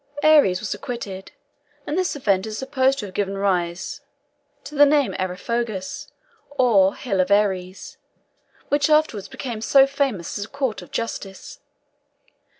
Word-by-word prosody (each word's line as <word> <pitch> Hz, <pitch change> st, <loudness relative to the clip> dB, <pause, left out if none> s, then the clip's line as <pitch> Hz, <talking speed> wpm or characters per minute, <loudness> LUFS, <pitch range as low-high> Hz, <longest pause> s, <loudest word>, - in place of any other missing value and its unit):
Ares 290 Hz, -13 st, +5 dB
was 215 Hz, -, -3 dB
acquitted, 200 Hz, -6 st, -7 dB, 0.5 s
and 295 Hz, -, -3 dB
this 370 Hz, -3 st, 0 dB
event 200 Hz, -7 st, +1 dB
is 215 Hz, 0 st, -5 dB
supposed 265 Hz, +1 st, +1 dB
to 215 Hz, -, -4 dB
have 190 Hz, -, -10 dB
given 195 Hz, 0 st, -2 dB
rise 185 Hz, +1 st, -1 dB, 0.6 s
to 280 Hz, +2 st, -10 dB
the 290 Hz, 0 st, +6 dB
name 285 Hz, -2 st, +2 dB
Areopagus 190 Hz, +2 st, -3 dB, 0.4 s
(or 230 Hz, -9 st, +3 dB
Hill 195 Hz, -7 st, 0 dB
of 185 Hz, -, -1 dB
Ares), 190 Hz, -2 st, 0 dB, 0.7 s
which 290 Hz, +1 st, +2 dB
afterwards 305 Hz, -10 st, +2 dB
became 235 Hz, -5 st, -6 dB
so 270 Hz, +4 st, +6 dB
famous 275 Hz, -, -2 dB
as 205 Hz, -, -3 dB
a -, -, -17 dB
court 270 Hz, -5 st, -2 dB
of -, -, -13 dB
justice. 200 Hz, -4 st, -6 dB
220 Hz, 145 wpm, -22 LUFS, 190-275 Hz, 0.7 s, the